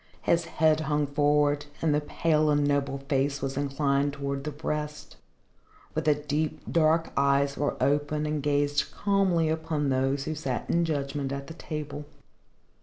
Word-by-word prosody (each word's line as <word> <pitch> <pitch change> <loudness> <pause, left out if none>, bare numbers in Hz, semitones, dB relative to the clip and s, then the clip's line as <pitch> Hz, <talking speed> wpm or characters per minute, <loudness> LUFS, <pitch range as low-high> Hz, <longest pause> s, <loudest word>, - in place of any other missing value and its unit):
His 170 0 +2
head 155 -1 +2
hung 150 -1 0
forward 145 0 +2
and 160 -2 +2
the 150 - +2
pale 155 0 +1
and 145 -1 +3
noble 140 -1 0
face 140 0 +1
was 135 -1 -3
inclined 140 0 0
towards 140 -1 -3
the 150 - -2
breast, 150 0 -5 0.8
but 155 0 -2
the 150 -1 +4
deep, 150 +1 -2
dark 165 0 +2
eyes 140 0 +2
were 145 - -1
open 145 +3 +1
and 150 -1 -1
gazed 145 0 +1
calmly 195 -5 +2
upon 155 -2 -1
those 135 +1 +1
who 155 - -3
sat 135 -5 -3
in 170 0 +2
judgment 140 -3 -2
at 140 0 -4
the 160 - -9
table. 150 -2 -6
145 Hz, 160 wpm, -27 LUFS, 140-155 Hz, 0.8 s, the